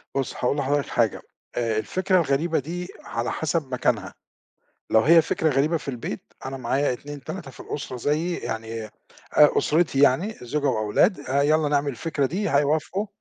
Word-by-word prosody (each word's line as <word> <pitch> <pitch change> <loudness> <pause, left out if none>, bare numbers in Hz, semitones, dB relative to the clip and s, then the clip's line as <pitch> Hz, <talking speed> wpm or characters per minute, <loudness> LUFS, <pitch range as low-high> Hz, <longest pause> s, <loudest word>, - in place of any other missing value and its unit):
بُصّ، 135 -2 -1
هاقول 125 +4 0
لحضرتك 145 +1 0
حاجة 115 -3 +1 0.3
آآ، 115 -2 0
الفكرة 185 - +1
الغريبة 160 +1 +1
دي 175 +6 -5 0.2
على 115 +1 -2
حسب 155 -4 -2
مكانها، 125 - 0 0.8
لو 110 - +6
هي 165 +7 +6
فكرة 160 - 0
غريبة 145 +5 +2
في 150 - -7
البيت 120 -3 -5
أنا 135 - -4
معايا 130 +2 0
2 145 +3 -7
3 170 -3 -6
في - - -15
الأسرة 140 -3 -5
زيي، 155 +7 0
يعني 110 0 -5
أ - - -17 0.7
أسرتي 155 -3 +2
يعني 160 +11 +3
زوجة 145 +4 -1
وأولاد 110 - +2
آآ، 140 +2 0
يالّا 155 +1 +3
نعمل 145 0 +1
الفكرة 140 +2 -1
دي 190 +6 -2
هيوافقوا 155 +8 +1
145 Hz, 165 wpm, -24 LUFS, 125-160 Hz, 0.8 s, لو